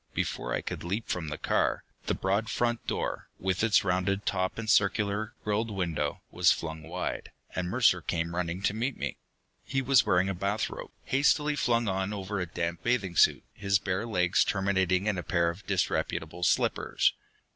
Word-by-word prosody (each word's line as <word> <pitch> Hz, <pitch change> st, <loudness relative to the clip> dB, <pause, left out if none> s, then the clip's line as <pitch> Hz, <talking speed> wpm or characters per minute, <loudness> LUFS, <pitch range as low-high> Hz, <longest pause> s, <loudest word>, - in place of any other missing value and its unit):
Before -, -, -2 dB
I -, -, 0 dB
could -, -, -5 dB
leap 100 Hz, +6 st, -3 dB
from 85 Hz, -3 st, -2 dB
the 75 Hz, -, -4 dB
car, -, -, +1 dB, 0.2 s
the -, -, +1 dB
broad 100 Hz, +4 st, 0 dB
front 120 Hz, -1 st, -1 dB
door, -, -, -3 dB
with 95 Hz, +2 st, -1 dB
its 110 Hz, -3 st, +4 dB
rounded 95 Hz, +2 st, 0 dB
top 95 Hz, -1 st, -1 dB
and 115 Hz, -1 st, -4 dB
circular, 105 Hz, +1 st, +2 dB
grilled 105 Hz, +2 st, 0 dB
window, 90 Hz, -6 st, -2 dB
was 90 Hz, -1 st, +4 dB
flung 80 Hz, -1 st, -3 dB
wide, -, -, -4 dB, 0.2 s
and 90 Hz, -1 st, -1 dB
Mercer 110 Hz, -5 st, +4 dB
came 85 Hz, +1 st, -2 dB
running 90 Hz, +1 st, -2 dB
to 100 Hz, -, +2 dB
meet 120 Hz, +5 st, -2 dB
me. -, -, -3 dB, 0.5 s
He 135 Hz, -, -1 dB
was 130 Hz, -3 st, +5 dB
wearing 95 Hz, -3 st, +3 dB
a 95 Hz, -, -1 dB
bathrobe, 100 Hz, +4 st, -2 dB
hastily 150 Hz, +2 st, +2 dB
flung 120 Hz, -4 st, +1 dB
on 95 Hz, +1 st, -1 dB
over 100 Hz, 0 st, -3 dB
a 90 Hz, -, -2 dB
damp 85 Hz, 0 st, -3 dB
bathing 105 Hz, -7 st, 0 dB
suit, -, -, +5 dB
his 100 Hz, -1 st, +1 dB
bare 95 Hz, +2 st, -2 dB
legs 90 Hz, -4 st, +3 dB
terminating 95 Hz, -1 st, +1 dB
in 105 Hz, -4 st, 0 dB
a -, -, -2 dB
pair 85 Hz, -1 st, +1 dB
of 95 Hz, +4 st, -13 dB
disreputable 90 Hz, -3 st, -1 dB
slippers. 90 Hz, -, +2 dB
95 Hz, 180 wpm, -29 LUFS, 90-110 Hz, 0.5 s, was